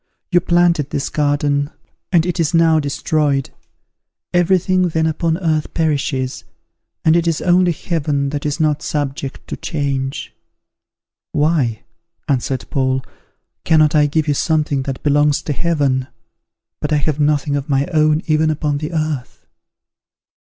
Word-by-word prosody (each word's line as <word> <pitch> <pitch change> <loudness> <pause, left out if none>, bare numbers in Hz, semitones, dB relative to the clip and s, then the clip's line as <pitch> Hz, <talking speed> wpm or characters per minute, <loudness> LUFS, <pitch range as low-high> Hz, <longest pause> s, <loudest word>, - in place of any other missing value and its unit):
You 175 - +5
planted 170 -4 +2
this 140 - -2
garden, 145 -1 +1 0.4
and 170 -3 +4
it 180 0 -2
is 165 0 +1
now 165 -1 +4
destroyed. 145 -1 0 0.8
Every 175 +1 +4
thing 185 0 +1
then 160 -1 0
upon 160 +1 0
earth 160 -4 -1
perishes, 140 -5 -1 0.6
and 160 0 +5
it 170 0 +2
is 165 -2 +1
only 180 0 +3
Heaven 145 -4 -1
that 145 -1 -3
is 150 +2 -2
not 150 -2 +1
subject 140 -2 -4
to - - -4
change." 140 -3 -3 1.0
"Why," 145 -7 +1 0.4
answered 135 -2 -1
Paul, 130 -1 0 0.6
"cannot 155 -1 +4
I 150 -1 +4
give 155 +1 0
you 145 - +2
something 150 -2 0
that 135 - -5
belongs 145 0 +2
to 150 - -2
Heaven? 140 -5 0 0.7
but 150 - -3
I 150 - +3
have 145 0 -1
nothing 145 -1 +1
of 140 +1 -3
my 140 0 +2
own 155 0 +3
even 155 0 +2
upon 150 -2 -1
the 155 +3 -5
earth." 155 -5 -3
150 Hz, 145 wpm, -18 LUFS, 140-160 Hz, 1.0 s, You